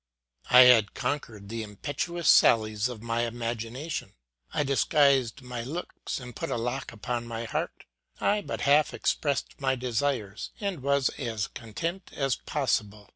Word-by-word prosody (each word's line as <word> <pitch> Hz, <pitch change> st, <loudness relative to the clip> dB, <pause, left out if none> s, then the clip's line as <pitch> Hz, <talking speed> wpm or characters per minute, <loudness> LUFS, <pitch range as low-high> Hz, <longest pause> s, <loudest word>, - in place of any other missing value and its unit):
I 125 Hz, -, +9 dB
had 120 Hz, -5 st, +6 dB
conquered 125 Hz, -6 st, -3 dB
the 115 Hz, +2 st, -4 dB
impetuous 145 Hz, -, -4 dB
sallies 110 Hz, 0 st, +5 dB
of 115 Hz, -3 st, -8 dB
my 115 Hz, 0 st, 0 dB
imagination; 120 Hz, +6 st, -4 dB, 0.4 s
I 150 Hz, -, +1 dB
disguised 140 Hz, -2 st, +3 dB
my 125 Hz, -1 st, -5 dB
looks 150 Hz, +6 st, -5 dB
and 125 Hz, -2 st, -10 dB
put -, -, -4 dB
a -, -, -1 dB
lock 125 Hz, +3 st, -3 dB
upon 120 Hz, +1 st, -4 dB
my 115 Hz, 0 st, -4 dB
heart; 110 Hz, -, -4 dB, 0.3 s
I 210 Hz, 0 st, +2 dB
but -, -, -5 dB
half 150 Hz, +1 st, +4 dB
expressed 140 Hz, -1 st, -1 dB
my 135 Hz, -1 st, +2 dB
desires, 120 Hz, -4 st, -2 dB
and 200 Hz, -8 st, -3 dB
was 140 Hz, 0 st, +2 dB
as 110 Hz, -6 st, -2 dB
content 165 Hz, -, -5 dB
as 135 Hz, -2 st, +1 dB
possible. 105 Hz, -7 st, -2 dB
125 Hz, 145 wpm, -28 LUFS, 115-140 Hz, 0.4 s, I